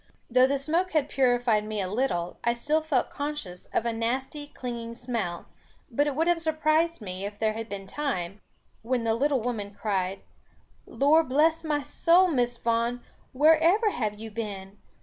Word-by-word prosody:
Though 255 +1 +6
the 280 +1 +1
smoke 330 +7 0
had 295 -2 +1
purified 245 -5 +2
me 215 0 -4
a 190 - -1
little, 185 -5 -1
I 235 0 +2
still 300 +6 +1
felt 300 -5 0
conscious 285 -12 -5
of 230 - -1
a 235 - 0
nasty 260 +6 -3
clinging 235 -4 -6
smell; 230 -8 -4 0.5
but 290 +5 +2
it 290 - -1
would 325 +3 +1
have 345 -1 +2
surprised 315 -2 +1
me, 185 -1 -5
if 205 +1 -5
there 220 0 +1
had 225 +1 -6
been 195 -1 -6
time, 200 -6 -3 0.4
when 245 +1 -1
the 225 -1 +1
little 270 +2 +1
woman 210 -4 -4
cried, 195 -2 -1 0.7
"Lor 310 +4 +4
bless 315 +4 +2
my 295 -2 -1
soul, 345 +7 +4
Miss 245 -5 0
Vaughan, 235 +1 0 0.3
where 305 +4 +5
ever 405 +7 +3
have 215 - -2
you 225 0 -7
been? 205 -2 -6
245 Hz, 175 wpm, -27 LUFS, 215-295 Hz, 0.7 s, Though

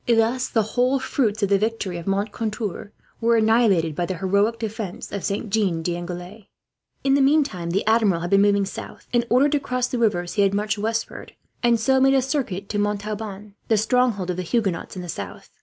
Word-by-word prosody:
Thus 235 +2 +2
the 225 - +1
whole 250 +5 +1
fruits 230 -5 -1
of 200 - +2
the 200 -1 +4
victory 210 -4 -2
of 170 - -10
Moncontour 210 0 -3 0.3
were 235 0 +3
annihilated 220 -8 +3
by 175 +2 -1
the 185 - -3
heroic 200 +5 +1
defence 220 -4 -5
of 200 - -4
Saint 200 +1 -3
Jean 190 -6 +1
d'Angely. 175 +4 -5 0.6
In 270 - +3
the 280 - +4
meantime, 275 - +2
the 190 +4 0
Admiral 215 -6 +3
had 175 - -4
been 195 0 +5
moving 200 -1 +3
south. 195 - -8
In 240 -1 +2
order 255 +5 +5
to 290 0 +1
cross 255 -2 -1
the 250 -1 -3
rivers 175 -6 0
he 205 - +1
had 200 0 +3
marched 210 0 -1
westward, 225 +1 -3 0.3
and 235 -1 +3
so 265 +3 +3
made 270 +1 +5
a 265 - +4
circuit 240 -9 -2
to 205 - -1
Montauban, 210 0 -3
the 220 - +3
stronghold 220 -4 +1
of 180 - -5
the - - -1
Huguenots 195 -2 -1
in 180 - -5
the - - -7
south. 100 - -7
210 Hz, 205 wpm, -23 LUFS, 195-235 Hz, 0.6 s, been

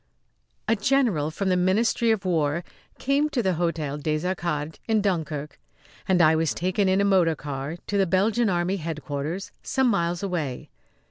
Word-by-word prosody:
A 225 - +3
general 215 - +1
from 190 +4 -2
the 185 - +3
Ministry 210 +6 +2
of 215 -3 +1
War 165 -2 0 0.3
came 280 +3 +1
to 250 -6 -1
the 190 - +2
Hôtel 160 -4 -2
des 155 +2 -1
Arcades, 165 -4 -2
in 220 -1 +3
Dunkirk, 160 -7 -2 0.5
and 180 -2 +4
I 155 0 +5
was 160 -1 0
taken 185 +2 +1
in 190 +1 +3
a 200 - +3
motor 180 -5 +3
car 145 +2 -5
to 205 - -1
the 195 - +3
Belgian 215 +6 +2
Army 180 +2 0
headquarters 155 +1 -4
some 265 -1 0
miles 175 -3 0
away. 160 -10 -3
180 Hz, 170 wpm, -25 LUFS, 155-200 Hz, 0.5 s, I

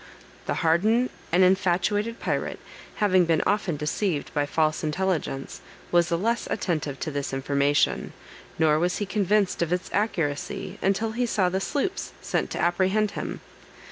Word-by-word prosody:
The - - 0
hardened 215 +10 +3 0.2
and 180 +2 +5
infatuated 195 +4 +2
pirate, - - -2 0.4
having 185 -4 +3
been 165 -2 +2
often 200 -6 0
deceived 150 +2 -2
by 145 -1 0
false 155 +1 +1
intelligence, 155 -4 -2 0.3
was 175 -1 +4
the 170 - +1
less 230 +5 0
attentive 155 -9 -2
to 155 - -2
this 140 -1 -3
information, 140 +1 +1 0.5
nor 155 -1 +3
was 175 +2 +1
he 205 - -2
convinced 200 -1 +1
of 170 -1 0
its 180 0 -2
accuracy 170 -9 -2
until 200 +3 +1
he 245 +2 -1
saw 190 -5 +2
the 190 +2 -1
sloops 330 - -2
sent - - -1
to - - -4
apprehend 190 +4 +2
him. - - -5
180 Hz, 150 wpm, -26 LUFS, 155-205 Hz, 0.5 s, and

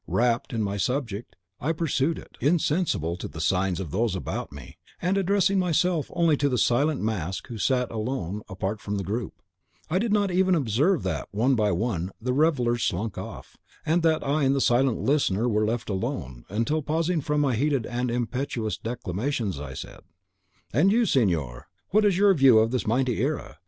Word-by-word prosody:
Rapt 120 +3 +1
in 115 -3 -1
my 100 0 -2
subject, 120 -1 -2 0.2
I 155 +5 0
pursued 160 -1 0
it, - - -12
insensible 150 - +1
to - - -5
the 80 - -9
signs 90 +2 +1
of 90 -7 -5
those 110 0 0
about 95 - -4
me; 70 -3 -12 0.2
and, 180 +3 0
addressing 195 0 +2
myself 180 -2 +1
only 170 -3 +3
to 145 +1 +1
the 125 - 0
silent 140 +6 +2
mask 95 -5 -2
who 115 -2 -6
sat 125 +1 +1
alone, 110 -4 -3
apart 95 +2 -3
from 105 -2 -3
the 100 - -2
group, 105 +2 -4 0.5
I 180 - +2
did 225 +1 -1
not 205 -2 +2
even 185 0 +3
observe 145 - +1
that, - - -2
one 120 +6 +1
by 105 -4 +2
one, 90 -2 -1
the 125 +2 -1
revellers 125 -5 +2
slunk 105 +4 -1
off, - - -9 0.3
and 165 +3 +2
that 160 -1 +2
I 145 +2 +1
and 135 0 +3
the - - +1
silent 125 -1 +3
listener 125 -6 +1
were 105 -2 +1
left 115 +1 -2
alone, 65 - -4
until, 115 - 0
pausing 160 +3 0
from 150 +2 0
my 140 -3 +2
heated 135 -1 +1
and 125 +1 -2
impetuous 120 -1 -2
declamations, 110 - -3
I 70 -2 -7
said, - - -8 0.7
"'And 160 - +4
you, 235 +2 +3
signor, 85 - 0 0.2
what 210 +2 +3
is 195 -4 +3
your 200 0 +5
view 135 -8 +6
of 110 +1 +3
this 125 -4 -1
mighty 125 +1 +1
era? - - -3
125 Hz, 190 wpm, -26 LUFS, 105-155 Hz, 0.7 s, view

